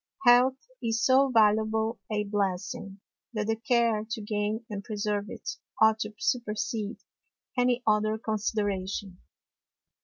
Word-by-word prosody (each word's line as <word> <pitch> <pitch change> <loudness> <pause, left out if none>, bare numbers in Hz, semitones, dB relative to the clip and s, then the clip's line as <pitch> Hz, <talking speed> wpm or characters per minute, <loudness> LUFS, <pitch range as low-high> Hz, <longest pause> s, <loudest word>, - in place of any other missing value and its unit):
Health 250 +2 +6 0.2
is 225 0 0
so 270 +1 +5
valuable 220 0 +3
a 210 -1 +1
Blessing, 195 -1 -3 0.3
that 215 -2 -1
the 225 +1 +1
Care 230 -1 +2
to 225 -1 -3
gain 210 +2 -2
and 205 -3 -5
preserve 210 -1 -2
it, - - -6 0.2
ought 220 0 +5
to 215 -1 -4
supersede 225 -2 -2 0.6
any 245 -1 +2
other 215 0 +2
Consideration. 205 -3 -2
215 Hz, 120 wpm, -28 LUFS, 210-230 Hz, 0.6 s, Health